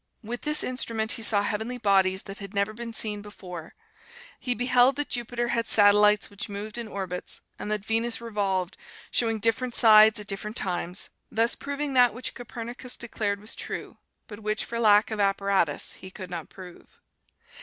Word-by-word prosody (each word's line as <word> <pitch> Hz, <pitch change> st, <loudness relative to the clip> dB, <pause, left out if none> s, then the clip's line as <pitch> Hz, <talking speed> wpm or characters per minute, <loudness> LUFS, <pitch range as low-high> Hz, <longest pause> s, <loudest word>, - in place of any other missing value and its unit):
With 240 Hz, +3 st, -5 dB
this 300 Hz, 0 st, +3 dB
instrument, 230 Hz, -3 st, -1 dB
he -, -, -2 dB
saw 205 Hz, -2 st, +6 dB
heavenly 220 Hz, +4 st, -3 dB
bodies 190 Hz, -4 st, +2 dB
that 195 Hz, 0 st, -8 dB
had 200 Hz, 0 st, -9 dB
never 200 Hz, +2 st, 0 dB
been 235 Hz, +1 st, -7 dB
seen 210 Hz, -2 st, -1 dB
before; 180 Hz, -5 st, -10 dB, 0.6 s
he 250 Hz, -1 st, -2 dB
beheld 250 Hz, +1 st, +3 dB
that 290 Hz, +1 st, -3 dB
Jupiter 240 Hz, 0 st, -2 dB
had 230 Hz, -1 st, 0 dB
satellites 210 Hz, 0 st, +5 dB
which 205 Hz, +1 st, -8 dB
moved 210 Hz, +3 st, -6 dB
in 235 Hz, -, -5 dB
orbits, 190 Hz, -3 st, -5 dB, 0.2 s
and 210 Hz, -, -5 dB
that 210 Hz, -1 st, -2 dB
Venus 225 Hz, +1 st, 0 dB
revolved, 200 Hz, -5 st, -2 dB, 0.3 s
showing 225 Hz, -2 st, +1 dB
different 230 Hz, +3 st, 0 dB
sides 215 Hz, 0 st, +7 dB
at 210 Hz, -, -6 dB
different 210 Hz, +2 st, -3 dB
times, 180 Hz, 0 st, -1 dB, 0.2 s
thus 230 Hz, +2 st, +2 dB
proving 285 Hz, 0 st, -4 dB
that 245 Hz, -3 st, +4 dB
which 250 Hz, -, -4 dB
Copernicus 245 Hz, +1 st, -5 dB
declared 210 Hz, -3 st, -2 dB
was 210 Hz, +2 st, -7 dB
true, -, -, -7 dB, 0.3 s
but 205 Hz, -1 st, -10 dB
which, 215 Hz, 0 st, -2 dB
for 235 Hz, -, -4 dB
lack 215 Hz, -1 st, +4 dB
of 215 Hz, -, -3 dB
apparatus, 195 Hz, -5 st, +1 dB
he 190 Hz, -, -10 dB
could 185 Hz, -1 st, -10 dB
not 170 Hz, -3 st, -6 dB
prove. 180 Hz, -2 st, -14 dB
215 Hz, 175 wpm, -26 LUFS, 200-235 Hz, 0.6 s, sides